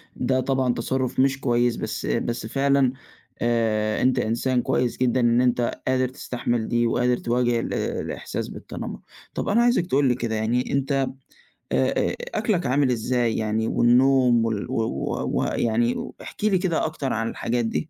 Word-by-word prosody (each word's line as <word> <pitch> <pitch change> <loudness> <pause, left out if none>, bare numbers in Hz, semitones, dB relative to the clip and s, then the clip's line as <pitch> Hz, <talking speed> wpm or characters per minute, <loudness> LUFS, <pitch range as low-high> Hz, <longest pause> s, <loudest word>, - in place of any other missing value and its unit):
ده 130 +1 0
طبعًا 130 -1 +1
تصرُّف 130 +2 -2
مش 135 +1 +3
كويس، 120 -1 +2
بس - - -4
بس 120 -1 -2
فعلًا 135 +1 +2 0.5
آآ 110 -2 +1
أنت 130 0 +3
إنسان 120 +3 0
كويس 120 0 0
جدًا 130 0 +1
إن 120 0 +3
أنت 125 -1 0
قادر 130 0 +2
تستحمل 120 -3 -3
دي 120 0 +1
وقادر 125 +1 +1
تواجه 120 0 +1
ال - - -3
الإحساس - - -3
بالتنمر، - - -7 0.3
طب - - -3
أنا 220 +3 +4
عايزك 240 -7 +3
تقول 140 -1 +2
لي 125 - +2
كده 115 -2 -2
يعني 115 +3 0
أنت 140 +1 0 0.6
آآ، - - -1
آآ - - 0 0.2
أكلك 185 -7 0
عامل 135 +1 +2
إزاي؟ 120 0 0
يعني 110 +1 0
والنوم 125 -1 +4
وال 110 +2 -3
و - - -2
و - - -3
ويعني 115 +1 +1
و - - -6
احكِ - - -10
لي 210 -3 +3
كده 180 -3 0
أكتر 155 -4 -3
عن 115 0 -1
الحاجات 120 0 -1
دي. 155 +7 -2
125 Hz, 170 wpm, -24 LUFS, 115-130 Hz, 0.6 s, أنا